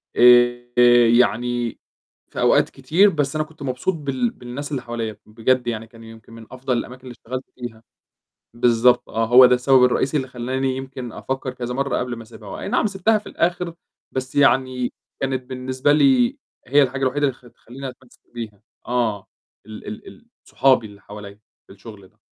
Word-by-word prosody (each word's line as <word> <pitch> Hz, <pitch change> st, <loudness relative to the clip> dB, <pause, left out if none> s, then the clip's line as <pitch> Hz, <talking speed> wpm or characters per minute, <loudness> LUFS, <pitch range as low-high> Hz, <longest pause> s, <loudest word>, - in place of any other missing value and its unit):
آآ 120 Hz, 0 st, +5 dB
يعني 120 Hz, 0 st, 0 dB, 0.5 s
في -, -, -7 dB
أوقات -, -, +3 dB
كتير، 165 Hz, +10 st, +3 dB
بس 145 Hz, -5 st, -2 dB
أنا 155 Hz, -, +1 dB
كنت 155 Hz, -1 st, -20 dB
مبسوط 130 Hz, +7 st, -1 dB
بال 135 Hz, -6 st, -2 dB
بالناس 130 Hz, +5 st, -8 dB
اللي 135 Hz, -, -2 dB
حواليّا، 115 Hz, -3 st, -5 dB
بجد 120 Hz, +3 st, 0 dB
يعني 115 Hz, -1 st, -3 dB
كان 115 Hz, 0 st, -16 dB
يمكن 115 Hz, 0 st, -14 dB
من 115 Hz, -1 st, -11 dB
أفضل 130 Hz, -1 st, -2 dB
الأماكن 125 Hz, +2 st, -6 dB
اللي 125 Hz, -, -9 dB
اشتغلت 130 Hz, +2 st, -7 dB
فيها، 115 Hz, -2 st, -9 dB, 0.7 s
بالضبط 120 Hz, +1 st, +3 dB
آه، 115 Hz, -, 0 dB
هو 125 Hz, +2 st, +8 dB
ده 125 Hz, -, +4 dB
السبب 125 Hz, +1 st, +4 dB
الرئيسي 130 Hz, +3 st, +1 dB
اللي 130 Hz, -3 st, -2 dB
خلّاني 130 Hz, +2 st, -2 dB
يمكن 130 Hz, -3 st, -7 dB
أفكّر 130 Hz, +2 st, -4 dB
كذا 125 Hz, -1 st, -5 dB
مَرّة 140 Hz, +1 st, -1 dB
قبل 125 Hz, -1 st, -3 dB
ما 115 Hz, -, -9 dB
أسيبها، 110 Hz, -2 st, -13 dB
هو -, -, -7 dB
أي -, -, -5 dB
نعم -, -, +1 dB
سيبتها 205 Hz, +2 st, +1 dB
في 210 Hz, -, -12 dB
الآخر، 175 Hz, 0 st, -1 dB, 0.4 s
بس 130 Hz, 0 st, -4 dB
يعني 130 Hz, -3 st, +2 dB, 0.3 s
كانت 130 Hz, -1 st, -1 dB
بالنسبة 130 Hz, +2 st, -1 dB
لي 255 Hz, -, +3 dB, 0.3 s
هي 145 Hz, +3 st, +4 dB
الحاجة 130 Hz, 0 st, -1 dB
الوحيدة 135 Hz, +2 st, 0 dB
اللي 135 Hz, -, -1 dB
خ 125 Hz, -, -20 dB
تخلّيني 125 Hz, +3 st, -10 dB
أتمسّك 125 Hz, 0 st, -15 dB
بيها، 110 Hz, -4 st, -8 dB, 0.2 s
آه، 115 Hz, -5 st, -1 dB, 0.4 s
ال 110 Hz, -1 st, -10 dB
ال 215 Hz, +1 st, -8 dB
ال 235 Hz, -, -16 dB, 0.2 s
صحابي 130 Hz, -4 st, +2 dB
اللي 100 Hz, -1 st, -14 dB
حواليّا، 100 Hz, 0 st, -11 dB, 0.3 s
في -, -, -15 dB
الشغل 100 Hz, -1 st, -13 dB
ده. -, -, -36 dB
125 Hz, 180 wpm, -21 LUFS, 120-135 Hz, 0.7 s, هو